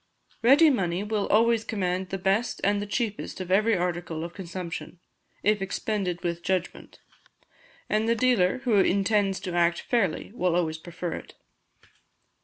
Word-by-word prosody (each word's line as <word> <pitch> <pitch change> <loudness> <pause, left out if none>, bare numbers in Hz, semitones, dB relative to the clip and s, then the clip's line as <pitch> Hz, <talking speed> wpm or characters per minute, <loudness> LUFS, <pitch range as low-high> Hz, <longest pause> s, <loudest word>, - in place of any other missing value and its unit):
Ready 285 +6 +6
money 185 -6 -1
will 210 -1 -1
always 230 +1 +3
command 185 -3 -2
the 195 - -3
best 195 +5 0
and 205 0 +1
cheapest 210 -2 -3
of 185 -1 -5
every 215 +2 +3
article 175 -2 -2
of 170 0 -6
consumption, 180 -2 -7 0.4
if 210 0 +2
expended 195 -2 -2
with 170 -1 -2
judgment; 185 0 -3 0.9
and 215 +1 +1
the 230 - +3
dealer, 230 -6 +2
who 235 -5 +2
intends 195 0 +2
to 180 - -5
act 170 0 +2
fairly, 200 -10 -1
will 180 -7 0
always 160 -2 0
prefer 175 +1 -6
it. - - -9
195 Hz, 145 wpm, -26 LUFS, 175-215 Hz, 0.9 s, Ready